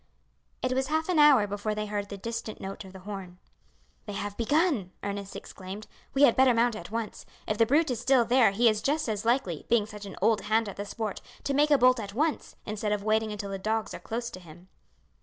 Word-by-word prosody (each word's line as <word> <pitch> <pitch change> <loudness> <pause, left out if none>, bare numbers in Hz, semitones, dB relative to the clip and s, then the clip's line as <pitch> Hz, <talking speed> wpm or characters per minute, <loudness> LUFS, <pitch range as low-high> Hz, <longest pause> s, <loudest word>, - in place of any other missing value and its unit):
It 255 - +1
was 265 +1 0
half 315 +2 0
an 350 -4 +3
hour 285 -8 +7
before 205 +1 -3
they 210 0 -2
heard 205 -1 -3
the 200 - -6
distant 230 +1 -5
note 195 +1 -6
of 190 - -12
the 190 0 -12
horn. 190 -2 -7 0.7
"They 205 - -5
have 205 0 -4
begun," 265 - +1
Ernest 200 -1 -4
exclaimed; 195 +3 -8 0.3
"we 275 - +4
had 260 -5 +6
better 260 -2 +5
mount 235 0 +2
at - - -8
once. 225 0 -4 0.2
If 215 - -1
the 230 - +5
brute 295 +3 +3
is 240 - -2
still 260 -2 +4
there 245 -1 +5
he 225 +5 +3
is 215 -1 +3
just 300 +4 0
as 215 -1 -2
likely, 230 - 0
being 230 -2 +3
such 210 -1 -9
an - - -8
old 225 -2 +3
hand 220 +1 +1
at 200 - -7
the 205 - -4
sport, 215 0 -4 0.2
to 280 - -1
make 295 +2 +3
a 290 - +6
bolt 255 0 +5
at 200 -2 -6
once, 305 +4 -1
instead 210 0 -3
of 205 -1 -2
waiting 220 0 +1
until 200 -1 -5
the 195 - -4
dogs 220 +2 -1
are - - -6
close 235 +1 -4
to 185 - -8
him." 175 +1 -15
215 Hz, 235 wpm, -28 LUFS, 200-250 Hz, 0.7 s, hour